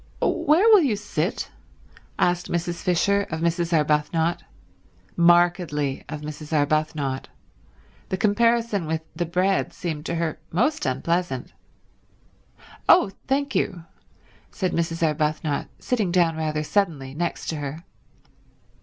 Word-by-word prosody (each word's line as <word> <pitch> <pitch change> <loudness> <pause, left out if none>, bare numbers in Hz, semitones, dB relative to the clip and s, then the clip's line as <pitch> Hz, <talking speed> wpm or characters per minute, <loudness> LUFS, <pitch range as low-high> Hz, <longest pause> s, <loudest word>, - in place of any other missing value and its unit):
"Where 325 +9 +3
will 425 -4 +8
you 265 -9 +2
sit?" 200 -2 -3 0.7
asked 175 0 +1
Mrs. 175 0 -2
Fisher 200 +3 +2
of 160 0 -4
Mrs. 170 0 0
Arbuthnot—markedly 165 0 0
of 150 -1 -5
Mrs. 150 0 -8
Arbuthnot; 150 -2 0 0.8
the 190 - -1
comparison 225 -2 +2
with 160 0 -1
the 175 - -2
bread 185 +3 +1
seemed 155 -3 -4
to - - -2
her 165 -2 -2
most 295 - +1
unpleasant. 135 +1 -1 1.4
"Oh, 195 - +6 0.2
thank 275 +1 0
you—" 175 -3 -1 0.7
said 185 -4 -2
Mrs. 165 0 -1
Arbuthnot, 150 -1 -1
sitting 215 -8 -1
down 170 -2 +3
rather 155 -1 -1
suddenly 155 -7 -1
next 170 +3 -3
to 160 - -2
her. 145 +3 -5
170 Hz, 115 wpm, -24 LUFS, 155-185 Hz, 1.4 s, will